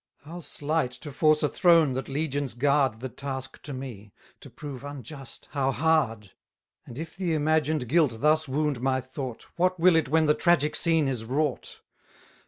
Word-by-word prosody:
How 165 Hz, +4 st, -8 dB
slight 155 Hz, -3 st, -1 dB
to 145 Hz, -, -7 dB
force 155 Hz, +2 st, +3 dB
a -, -, +4 dB
throne 165 Hz, -5 st, +4 dB
that 130 Hz, +2 st, -4 dB
legions 140 Hz, -3 st, -2 dB
guard 135 Hz, -3 st, +2 dB
The 130 Hz, -, -4 dB
task 130 Hz, 0 st, -6 dB
to 145 Hz, -, -8 dB
me! 120 Hz, -6 st, -8 dB, 0.3 s
to -, -, -12 dB
prove 140 Hz, -3 st, -8 dB
unjust, 140 Hz, -2 st, -9 dB
how 135 Hz, -3 st, 0 dB
hard! 135 Hz, -10 st, +1 dB, 0.6 s
And 120 Hz, -, -10 dB
if 160 Hz, +1 st, -7 dB
the 175 Hz, -3 st, -1 dB
imagined 155 Hz, -3 st, +1 dB
guilt 145 Hz, -4 st, +2 dB
thus 155 Hz, +3 st, +3 dB
wound 145 Hz, -2 st, -1 dB
my 130 Hz, 0 st, +1 dB
thought, 130 Hz, -1 st, -7 dB
What 185 Hz, 0 st, +1 dB
will 175 Hz, 0 st, +5 dB
it 160 Hz, -4 st, +2 dB
when 160 Hz, +2 st, +3 dB
the 150 Hz, -, +4 dB
tragic 155 Hz, -3 st, +2 dB
scene 165 Hz, -4 st, +2 dB
is 125 Hz, -4 st, -2 dB
wrought! 140 Hz, +3 st, -2 dB
145 Hz, 175 wpm, -27 LUFS, 130-155 Hz, 0.6 s, will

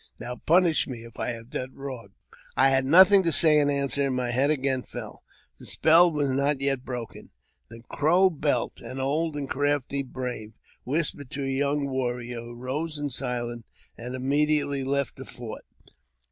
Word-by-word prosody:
Now 125 Hz, -, -5 dB
punish 170 Hz, -1 st, +3 dB
me 120 Hz, -4 st, -7 dB
if 115 Hz, -1 st, -13 dB
I -, -, -1 dB
have 115 Hz, 0 st, -7 dB
done 130 Hz, +1 st, -5 dB
wrong." 130 Hz, -7 st, -8 dB, 0.4 s
I 135 Hz, +1 st, +6 dB
had 135 Hz, 0 st, +2 dB
nothing 190 Hz, +7 st, +7 dB
to 170 Hz, -2 st, +1 dB
say 155 Hz, -1 st, +5 dB
in 145 Hz, -1 st, +2 dB
answer, 140 Hz, -1 st, +1 dB
and 130 Hz, -, -1 dB
my 125 Hz, -1 st, -1 dB
head 135 Hz, +4 st, +2 dB
again 135 Hz, -3 st, +1 dB
fell -, -, -9 dB, 0.2 s
— -, -, -36 dB
the -, -, -11 dB
spell 165 Hz, +3 st, +5 dB
was 150 Hz, -2 st, 0 dB
not 140 Hz, +1 st, +1 dB
yet 135 Hz, -2 st, 0 dB
broken. 120 Hz, -4 st, -7 dB, 0.4 s
The 115 Hz, +1 st, -12 dB
Crow 175 Hz, +6 st, +3 dB
Belt, 145 Hz, -6 st, -1 dB
an 130 Hz, -, -7 dB
old 150 Hz, +4 st, -1 dB
and 145 Hz, -2 st, -4 dB
crafty 145 Hz, 0 st, -1 dB
brave, 125 Hz, -4 st, -6 dB, 0.3 s
whispered 145 Hz, -1 st, -2 dB
to 140 Hz, -, -4 dB
a -, -, -2 dB
young 140 Hz, +2 st, 0 dB
warrior, 120 Hz, -2 st, -3 dB
who 120 Hz, +1 st, -10 dB
rose 145 Hz, +6 st, -4 dB
in 145 Hz, -1 st, -3 dB
silence, 120 Hz, -2 st, -3 dB, 0.3 s
and 125 Hz, +2 st, -6 dB
immediately 140 Hz, +1 st, +1 dB
left 140 Hz, -1 st, -1 dB
the -, -, -7 dB
fort. -, -, -8 dB
135 Hz, 180 wpm, -26 LUFS, 125-150 Hz, 0.4 s, nothing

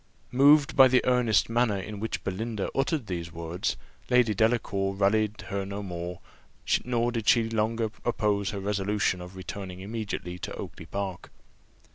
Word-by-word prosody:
Moved 140 Hz, +2 st, +5 dB
by 135 Hz, -1 st, +9 dB
the 130 Hz, 0 st, +3 dB
earnest 125 Hz, -3 st, +3 dB
manner 115 Hz, -3 st, +1 dB
in 105 Hz, +2 st, -6 dB
which 110 Hz, +1 st, -3 dB
Belinda 105 Hz, +2 st, -3 dB
uttered 135 Hz, 0 st, 0 dB
these 85 Hz, -4 st, -4 dB
words, 85 Hz, +2 st, -3 dB, 0.3 s
Lady 125 Hz, -3 st, +4 dB
Delacour 100 Hz, -3 st, +1 dB
rallied 105 Hz, +2 st, +1 dB
her 100 Hz, 0 st, -2 dB
no 100 Hz, +1 st, -5 dB
more, 90 Hz, -1 st, -5 dB, 0.6 s
nor 120 Hz, -1 st, 0 dB
did 115 Hz, -2 st, -3 dB
she 115 Hz, -2 st, +5 dB
longer 115 Hz, 0 st, 0 dB
oppose 105 Hz, -4 st, 0 dB
her 100 Hz, -, -4 dB
resolution 100 Hz, -1 st, 0 dB
of 90 Hz, +1 st, -10 dB
returning 95 Hz, 0 st, -7 dB
immediately 95 Hz, -4 st, -5 dB
to -, -, -5 dB
Oakly 80 Hz, -, -8 dB
park. 95 Hz, -1 st, -4 dB
105 Hz, 150 wpm, -28 LUFS, 95-115 Hz, 0.6 s, by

